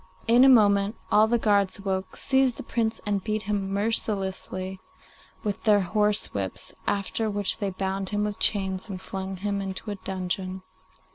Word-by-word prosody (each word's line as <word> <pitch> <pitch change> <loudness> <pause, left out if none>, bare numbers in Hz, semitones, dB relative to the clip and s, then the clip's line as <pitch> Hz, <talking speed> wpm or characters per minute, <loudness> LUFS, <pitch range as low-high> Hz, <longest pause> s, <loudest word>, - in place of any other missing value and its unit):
In 240 +2 +6
a 270 - +8
moment 205 -3 +5 0.2
all 215 +1 +6
the 240 +2 +2
guards 200 -4 +2
awoke, 190 -1 -3
seized 265 -2 +2
the - - -6
Prince 225 -1 -1
and 200 -2 -1
beat 215 -1 -2
him 200 -1 -2
mercilessly 195 -3 -1 0.6
with 205 -3 -2
their 210 -2 +5
horse 210 +3 +1
whips, 95 -2 -4
after 205 +2 -1
which 205 -2 0
they 200 - -1
bound 190 0 -3
him 205 0 0
with 210 -1 -3
chains, 190 -1 +1
and 190 -2 -5
flung 190 0 -5
him 200 +1 -2
into 195 +2 -5
a - - -3
dungeon. 185 0 -4
200 Hz, 165 wpm, -26 LUFS, 190-215 Hz, 0.6 s, a